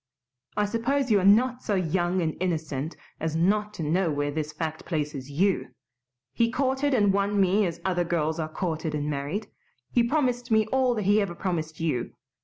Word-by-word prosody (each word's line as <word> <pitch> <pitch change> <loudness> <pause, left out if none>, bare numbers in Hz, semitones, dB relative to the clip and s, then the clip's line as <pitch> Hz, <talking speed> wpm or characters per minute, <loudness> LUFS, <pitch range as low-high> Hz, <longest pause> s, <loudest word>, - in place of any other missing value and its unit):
I 210 - +3
suppose 250 +5 0
you 205 - +5
are - - -1
not 240 +6 +4
so 205 - -1
young 180 0 +1
and 160 -1 -1
innocent 160 -4 -2 0.2
as 160 0 -2
not 205 +5 +2
to 165 - -4
know 170 +4 +1
where 145 -1 -1
this 155 0 -3
fact 155 0 -4
places 150 -5 -3
YOU. 185 +7 +1 0.7
He 230 0 +2
courted 265 +1 +1
and 205 -4 +3
won 200 +1 +1
me 195 +1 +3
as 170 -1 -5
other 180 -2 +1
girls 165 -1 -1
are 155 -1 -2
courted 160 -2 -2
and 150 0 -2
married. 145 +9 -3 0.4
He 240 - +4
promised 245 -1 0
me 220 -1 +4
all 260 -2 +2
that 215 - -1
he 205 +2 +4
ever 185 -4 -2
promised 160 -4 -3
you. 150 -8 -1
185 Hz, 190 wpm, -26 LUFS, 155-215 Hz, 0.7 s, you